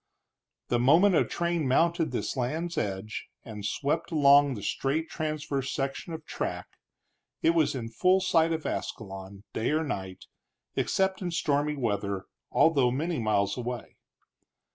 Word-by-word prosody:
The 120 - +2
moment 165 +11 +5
a - - +5
train 170 -3 -1
mounted 165 +5 +2
this - - -3
land's 155 +7 -2
edge 100 +2 -3 0.2
and 105 -3 -8
swept 145 +10 -1
along 145 -3 +5
the 100 - -7
straight 150 +9 -1
transverse 150 -3 -2
section 135 +5 -3
of 160 -1 -7
track, - - -4 0.7
it 165 - +5
was 160 -4 +2
in 120 -3 -4
full 185 +11 +3
sight 165 -3 +3
of 160 -1 -2
Ascalon, 95 -1 -5
day 110 - 0
or 155 +2 +1
night, 95 -9 -5 0.5
except 190 0 +1
in 180 - -2
stormy 150 -3 0
weather, 100 -6 -2 0.3
although 140 -6 +4
many 155 +5 -1
miles 100 -3 +1
away. 125 0 -5
140 Hz, 140 wpm, -28 LUFS, 115-165 Hz, 0.7 s, moment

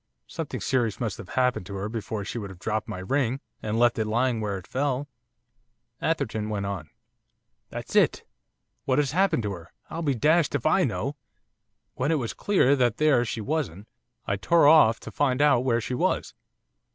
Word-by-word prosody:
Something - - -5
serious 120 -5 0
must 110 -6 -3
have 90 - -9
happened 125 -7 0
to 100 - -6
her 100 +1 -3
before 110 -2 -4
she 120 - -4
would 100 -3 -6
have 95 - -11
dropped 110 +3 -2
my - - -5
ring, 130 +6 0 0.2
and 110 +1 -2
left 120 0 +3
it 110 - 0
lying 120 +1 +1
where 100 -2 -2
it 95 - -10
fell.' 140 +1 -1 0.9
Atherton 110 -9 -1
went 100 -2 -2
on. 90 -6 -5 0.8
'That's - - -7
it! - - +3 0.6
What 130 - +1
has 145 -3 +2
happened 185 - +2
to 105 - -2
her! 85 -3 -9 0.2
I'll 165 - -4
be 145 -5 +1
dashed 155 +5 +3
if 135 - -2
I 175 +4 +4
know! 140 +4 -3 0.8
When 140 +5 -1
it 160 - +3
was 120 -5 -3
clear 160 -9 +3
that 125 -4 +1
there 150 -5 +4
she 115 -1 -4
wasn't, 110 - -3 0.4
I 100 - -1
tore 165 - +4
off 150 -8 +6
to - - -8
find 135 -3 +1
out 140 -4 +4
where 120 -2 +2
she 125 - -4
was. 125 - 0
120 Hz, 190 wpm, -26 LUFS, 105-145 Hz, 0.9 s, off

